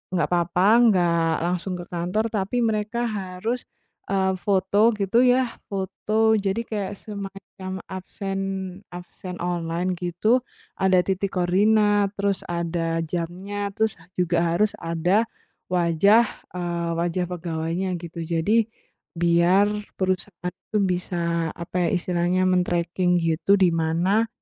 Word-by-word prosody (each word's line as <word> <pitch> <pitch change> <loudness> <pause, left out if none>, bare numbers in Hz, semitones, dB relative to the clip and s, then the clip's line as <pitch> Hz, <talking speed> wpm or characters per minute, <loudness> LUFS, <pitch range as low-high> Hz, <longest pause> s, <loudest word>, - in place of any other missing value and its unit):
nggak 170 -4 +2
apa-apa 175 +2 +2 0.2
nggak 170 -4 +3
langsung 180 +2 -1
ke 175 - -6
kantor, 180 +6 -1
tapi 215 +4 0
mereka 220 +1 0
harus, 215 +2 -3 0.4
eee, 190 -1 +1
foto 200 +4 +3
gitu 200 +2 +2
ya, 250 +1 +4 0.2
foto. 215 +3 0
Jadi 200 +3 -1
kayak 205 -3 -4
semacam 195 -2 -8
absen 195 +1 -5 0.6
absen 180 +1 -8
online 175 +1 -1
gitu 180 +8 +2 0.4
ada 185 -1 +4
titik 195 +1 -2
koordinat, 205 +2 +3
terus 200 -1 -1
ada 165 -1 -1
jamnya, 185 +5 -4
terus 220 -4 0 0.2
juga 170 -1 +1
harus 210 +3 +3
ada 175 +7 +1 0.4
wajah, 180 +6 +4 0.3
eee, 170 -1 -2
wajah 175 +2 0
pegawainya 170 +1 -3
gitu. 170 -1 -6
Jadi, 185 +7 +2 0.5
biar 175 +4 +4 0.2
perusahaan 185 -1 -2
itu 210 +4 -5
bisa 170 -2 -1
apa 175 0 -1
ya - - +1
istilahnya, 175 +1 0
men-tracking 180 0 +1
gitu 165 +3 +2
di 185 -3 +4
mana 170 +7 +1
185 Hz, 120 wpm, -24 LUFS, 170-200 Hz, 0.6 s, ya